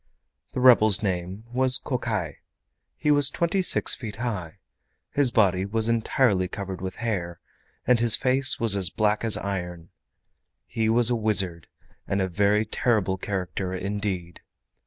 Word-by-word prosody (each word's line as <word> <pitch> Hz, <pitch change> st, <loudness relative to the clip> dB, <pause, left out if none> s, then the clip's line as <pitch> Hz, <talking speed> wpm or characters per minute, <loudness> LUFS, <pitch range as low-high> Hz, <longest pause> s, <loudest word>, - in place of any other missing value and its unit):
The -, -, -3 dB
rebel's 110 Hz, -4 st, +5 dB
name 95 Hz, +1 st, -3 dB
was 130 Hz, 0 st, +3 dB
Kokai. -, -, -3 dB, 0.6 s
He 150 Hz, -, +1 dB
was 145 Hz, -2 st, +3 dB
twenty 170 Hz, +5 st, -1 dB
six 180 Hz, -, +3 dB
feet 110 Hz, -5 st, -7 dB
high. 100 Hz, -9 st, -5 dB, 0.5 s
His 140 Hz, -3 st, +2 dB
body 95 Hz, -5 st, +2 dB
was 110 Hz, +3 st, -1 dB
entirely 115 Hz, -4 st, +1 dB
covered 95 Hz, -1 st, -7 dB
with 95 Hz, -1 st, -5 dB
hair, 85 Hz, -6 st, -3 dB, 0.5 s
and 125 Hz, -1 st, +3 dB
his 115 Hz, -2 st, +5 dB
face 130 Hz, +1 st, +1 dB
was 115 Hz, -3 st, +3 dB
as 95 Hz, -3 st, 0 dB
black 105 Hz, +1 st, 0 dB
as 110 Hz, -3 st, +3 dB
iron. 90 Hz, -4 st, -5 dB, 0.8 s
He 110 Hz, -1 st, -2 dB
was 120 Hz, +1 st, +4 dB
a -, -, +2 dB
wizard 95 Hz, -7 st, 0 dB, 0.4 s
and 100 Hz, -, -1 dB
a 95 Hz, -, 0 dB
very 100 Hz, +4 st, +1 dB
terrible 105 Hz, -4 st, 0 dB
character 95 Hz, -1 st, -4 dB
indeed. 95 Hz, -3 st, -4 dB
105 Hz, 145 wpm, -25 LUFS, 95-115 Hz, 0.8 s, rebel's